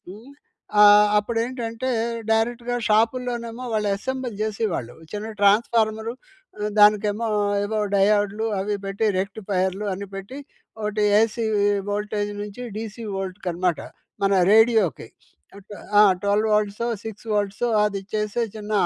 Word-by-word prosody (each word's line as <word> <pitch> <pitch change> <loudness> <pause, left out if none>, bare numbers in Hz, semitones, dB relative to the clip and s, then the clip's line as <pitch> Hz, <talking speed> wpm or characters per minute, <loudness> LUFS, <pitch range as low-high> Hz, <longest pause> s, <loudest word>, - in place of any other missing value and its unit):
హ్మ్. 220 +8 -11 0.5
ఆహ్, 210 0 +8
అప్పుడేంటంటే, 230 +2 -3 0.4
డైరెక్ట్‌గా 240 +2 0
షాపుల్లోనేమో, 235 +2 0
వాళ్ళు 210 -1 0
ఎసెంబుల్ 260 +1 -4
జేసేవాళ్ళు. 205 - -3 0.2
చిన్న 210 +2 -5
ట్రాన్స్‌ఫార్మరు 220 +2 +2 0.5
ఆహ్, 210 0 -1
దానికేమో 210 +2 +4 0.4
ఏవో 215 +1 -2 0.2
డయోడ్లు 205 +2 +2
అవీ 205 +1 -1
బెట్టి, 200 +3 -1
రెక్టిఫయర్లు 195 0 -2
అన్ని 200 +1 -7
పెట్టి, 195 +8 -8 0.4
ఒకటి 210 0 -1 0.2
ఏసీ 225 +1 0 0.5
వోల్టేజ్ 205 0 -2
నుంచి, 210 +4 -8
డీసీ 220 +1 -6
వోల్ట్‌కనమాట 185 -3 -2 0.4
మన 195 - +2 0.2
రేడియోకి. 220 - +3 0.5
ఏం 200 - -11
ట్వ 205 - -9 0.2
ఆ! - - +9 0.2
12 210 +2 +2
వోల్ట్‌సో, 210 +2 0 0.2
6 220 +1 -8
వోల్ట్‌సో, 205 +3 -1 0.2
అది 200 -2 -1
చేసే 210 +2 -1
చిన్న 210 0 -6
210 Hz, 120 wpm, -23 LUFS, 205-225 Hz, 0.5 s, ఆ